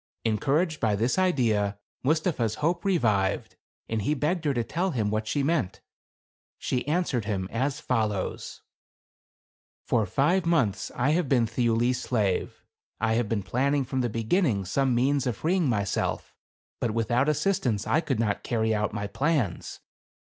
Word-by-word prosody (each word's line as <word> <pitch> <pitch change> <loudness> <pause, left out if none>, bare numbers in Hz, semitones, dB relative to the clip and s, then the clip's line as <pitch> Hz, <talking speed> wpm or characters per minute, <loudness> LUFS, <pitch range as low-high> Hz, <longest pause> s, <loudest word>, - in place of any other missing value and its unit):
Encouraged 150 - +1
by 110 -3 +1
this 115 - +1
idea, 110 - +1 0.2
Mustapha's 145 - 0
hope 170 +3 0
re 195 -3 +2
vived, 100 - 0 0.4
and 110 -1 -1
he 150 +9 0
begged 155 +4 -1
her 145 - +2
to 120 - +1
tell 175 +10 -1
him 110 - -1
what 110 0 -1
she 145 +4 0
meant. 150 - 0 0.8
She 125 +1 -2
answered 150 - 0
him 95 -3 -2
as 135 +5 -1
follows: 110 -8 -2 0.6
— - - -54
"For 110 -4 +2
five 150 - +2
months 120 - +1
I 135 +4 +2
have 165 -3 +1
been 125 -4 +3
Thiuli's 120 +2 +1
slave. 105 -7 -1 0.4
I 110 0 +1
have 115 -2 0
been 105 -4 -1
planning 135 +8 +1
from 130 +1 -1
the 120 - 0
beginning, 115 - +1
some 130 +6 +1
means 135 +2 +2
of 115 -5 -2
freeing 170 -2 +1
myself; 100 -4 -1 0.5
but 115 -2 -1
without 120 +5 +1
assistance 150 - 0
I 155 - +2
could 140 -8 -2
not 105 -3 0
carry 110 -2 0
out 105 0 -1
my 105 -1 -3
plans. 130 - -1
120 Hz, 160 wpm, -27 LUFS, 110-150 Hz, 0.8 s, been